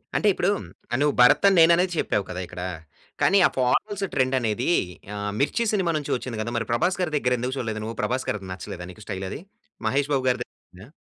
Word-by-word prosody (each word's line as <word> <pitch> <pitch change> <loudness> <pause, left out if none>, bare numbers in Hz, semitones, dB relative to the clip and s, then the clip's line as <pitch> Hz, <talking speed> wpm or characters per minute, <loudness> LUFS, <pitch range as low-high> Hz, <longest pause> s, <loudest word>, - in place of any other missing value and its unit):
అంటే 210 - +2
ఇప్పుడు 185 +3 +1 0.5
నువ్వు 145 0 +3
భరత్ 125 +10 +6
అని 195 -2 +4
నేననే 170 +2 +6
చెప్పావు 100 - 0
కదా 90 - -4
ఇక్కడ. 90 0 -8 0.6
కానీ 200 - +5
ఆ - - -6
ఫార్మల్స్ 195 +11 +1
ట్రెండ్ 130 0 +2
అనేది 120 +4 -1 0.5
ఆహ్, 105 0 -3
'మిర్చి' 230 +11 +1
సినిమా 185 -4 +1
నుంచి 145 - -4
వచ్చింది 125 -3 -5
కదా! 115 +2 -3
మరి 115 - -1
ప్రభాస్ 180 +10 +1
గారి 165 -4 -1
దగ్గర 125 -3 +1
ఎందుకు 125 +3 -2
చూడలేదు 110 -3 -3
నువ్వు? 115 +1 -5
'ప్రభాస్' 130 +1 -1
గారిది 100 -3 -3
నచ్చలేదా 90 -1 -7
నీకు 105 +4 -13
స్టైల్ 95 -2 -4
అది? - - -6 0.5
మహేష్ 140 +4 +1
బాబు 130 -2 +1
గారిదే 125 - -1
నచ్చిందా? 95 +5 -17
125 Hz, 200 wpm, -25 LUFS, 110-160 Hz, 0.6 s, భరత్